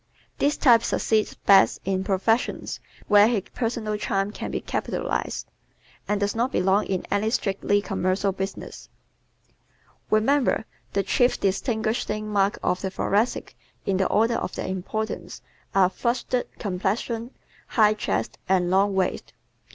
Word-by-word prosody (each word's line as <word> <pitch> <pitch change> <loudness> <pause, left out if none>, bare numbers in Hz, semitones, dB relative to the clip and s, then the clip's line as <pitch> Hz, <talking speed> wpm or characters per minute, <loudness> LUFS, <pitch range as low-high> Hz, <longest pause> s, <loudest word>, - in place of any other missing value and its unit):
This 290 +1 +2
type 235 -5 +6
succeeds 220 -1 0
best 195 -1 +5
in 190 0 0
professions 205 +5 0 0.3
where 205 0 +7
his 225 -5 0
personal 225 -3 -2
charm 195 0 -1
can - - -6
be - - -2
capitalized, - - -3 0.6
and 210 0 0
does 205 0 0
not 240 +4 0
belong 190 +1 +2
in 190 -2 -2
any 205 +2 +1
strictly 205 -2 0
commercial 195 0 0
business. 190 +1 -6 1.2
_Remember, 245 +6 +2 0.3
the 200 - +1
chief 245 +4 +2
distinguishing 215 +1 -1
marks 200 -1 +1
of 180 - 0
the 190 - -2
Thoracic 205 +4 -1 0.3
in 195 -2 +1
the 190 - +2
order 225 +2 +2
of - - -4
their - - -4
importance, 190 +4 -4 0.3
are 190 -2 +6
FLUSHED 240 +5 -1
COMPLEXION, 215 +4 -2 0.4
HIGH 215 -2 +4
CHEST 215 - -2
and 180 -2 +2
LONG 195 +1 +3
WAIST. 190 -1 -1
205 Hz, 135 wpm, -25 LUFS, 195-225 Hz, 1.2 s, where